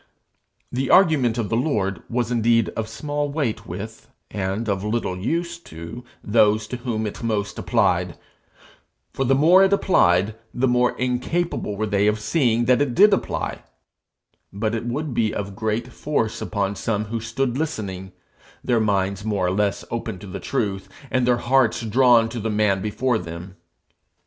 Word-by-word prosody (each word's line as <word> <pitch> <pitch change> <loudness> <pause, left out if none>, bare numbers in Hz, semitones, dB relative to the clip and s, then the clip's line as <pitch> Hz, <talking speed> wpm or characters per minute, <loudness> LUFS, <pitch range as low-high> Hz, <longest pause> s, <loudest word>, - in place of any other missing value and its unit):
The 130 +2 -2
argument 150 -11 +4
of 115 -4 -2
the 115 - 0
Lord 105 - 0
was 120 0 -1
indeed 115 -1 +2
of 110 -1 -4
small 145 +5 -3
weight 140 -7 -2
with, - - -7 0.2
and 100 +3 -2
of 100 -2 -1
little 105 -3 -1
use 170 - -2
to, 85 - -9 0.2
those 105 0 +3
to 125 - -4
whom 115 -3 -3
it 105 - -5
most 105 -3 -2
applied, 90 -7 +1 1.0
for 135 - -1
the 135 +2 +3
more 170 +7 +6
it 195 - +3
applied, 100 - +3 0.2
the 130 +2 +2
more 125 0 +2
incapable 125 -1 -1
were 110 - 0
they 100 -1 +1
of 105 0 +1
seeing 120 0 +1
that 125 +2 +3
it 130 -4 0
did 205 +1 +6
apply; - - -2 0.9
but 110 +3 -2
it 115 +1 -3
would 140 +3 -3
be 110 -2 0
of 100 -1 -4
great 110 +3 -2
force 130 -7 -2
upon 100 -1 -2
some 105 0 -2
that 115 -1 -2
stood 125 +2 -2
listening, 100 -11 -4 0.5
their 120 -2 +2
minds 100 -2 0
more 105 -4 0
or 90 - +1
less 100 +1 0
open - - -3
to 105 - -11
the 95 0 -6
truth, 100 -7 -2 0.2
and 130 -1 +1
their 125 -1 +4
hearts 120 -1 +2
drawn 120 0 +4
to 115 +1 -5
the 110 +1 -2
man 105 -2 +1
before 110 +3 0
them. 85 +2 -8
115 Hz, 170 wpm, -22 LUFS, 100-125 Hz, 1.0 s, more